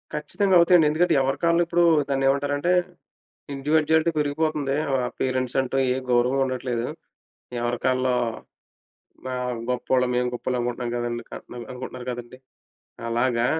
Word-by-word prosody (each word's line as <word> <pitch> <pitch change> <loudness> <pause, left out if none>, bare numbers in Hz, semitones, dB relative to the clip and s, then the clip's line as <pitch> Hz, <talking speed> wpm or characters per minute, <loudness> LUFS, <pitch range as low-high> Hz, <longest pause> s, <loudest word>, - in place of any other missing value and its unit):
ఖచ్చితంగా 195 -3 +1
అవుతాయండి. 170 -2 +6
ఎందుకంటే 165 +3 +2
ఎవరికాళ్ళు 165 +6 +2
ఇప్పుడు 175 +1 +2 0.3
దాన్ని 135 0 +1
ఏమంటారంటే 145 +4 0 0.8
ఇండివిడ్యుయాలిటీ 155 +3 +2
పెరిగిపోతుంది. 145 -1 0 0.2
ఆ! - - +3 0.2
పేరెంట్స్ 130 -1 -1
అంటూ 130 +1 -3 0.2
ఏ - - -2 0.2
గౌరవం 125 +3 +3
ఉండట్లేదు. 125 -2 -2 0.7
ఎవరికాళ్ళలో 125 +1 0 1.2
ఆ! - - -2 0.4
గొప్పోళ్ళం 125 0 +1
మేము 125 0 +1
గొప్పోళ్ళు 125 +1 -2
అనుకుంటున్నాం 120 0 -3
కదండీ, 120 0 -3
క - - -26 0.4
అనుకుంటున్నారు 125 0 -7
కదండీ. 120 +1 -8 0.7
అలాగా 120 0 +1
130 Hz, 115 wpm, -24 LUFS, 125-150 Hz, 1.2 s, అవుతాయండి